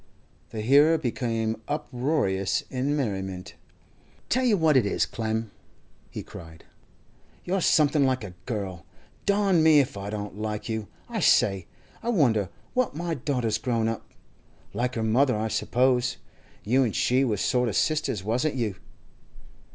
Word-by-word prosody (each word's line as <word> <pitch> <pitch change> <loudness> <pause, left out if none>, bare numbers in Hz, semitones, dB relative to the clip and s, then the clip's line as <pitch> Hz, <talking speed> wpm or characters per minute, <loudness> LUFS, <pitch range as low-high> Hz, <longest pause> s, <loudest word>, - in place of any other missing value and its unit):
The 110 - -5
hearer 145 +8 +5
became 115 -5 -2
uproarious 125 -9 -1
in 135 +3 0
merriment. 95 -8 -3 0.8
'Tell 255 +2 +2
you 220 -5 +4
what 160 -3 +3
it 130 - +5
is, 100 - +1
Clem,' 110 -1 -3 0.6
he - - -6
cried, 80 -1 -12 0.8
'you're 185 +1 0
something 150 -2 +4
like 130 -3 +1
a 95 -4 -7
girl! 95 - -4 0.4
Darn 200 -4 +3
me 155 -2 +6
if 130 -7 0
I 100 +1 -5
don't 105 -1 -5
like 105 -1 -3
you! 110 -2 -3 0.2
I - - -3
say, 95 -3 +3 0.3
I 235 - -3
wonder 120 - +2 0.2
what 255 - 0
my 170 +1 -2
daughter's 125 -6 -1
grown 115 -1 0
up? 115 -1 -4 0.6
Like 125 +1 -1
her 115 - -1
mother, 120 +2 +3
I 110 +1 -1
suppose. 125 +2 +1 0.5
You 130 +5 +3
an' 115 -5 -1
she 130 +2 +2
was 110 -7 0
sort 125 -2 +1
of 100 - -4
sisters, 150 -10 0
wasn't 125 +8 0
you? 110 -7 -2
120 Hz, 150 wpm, -26 LUFS, 105-145 Hz, 0.8 s, me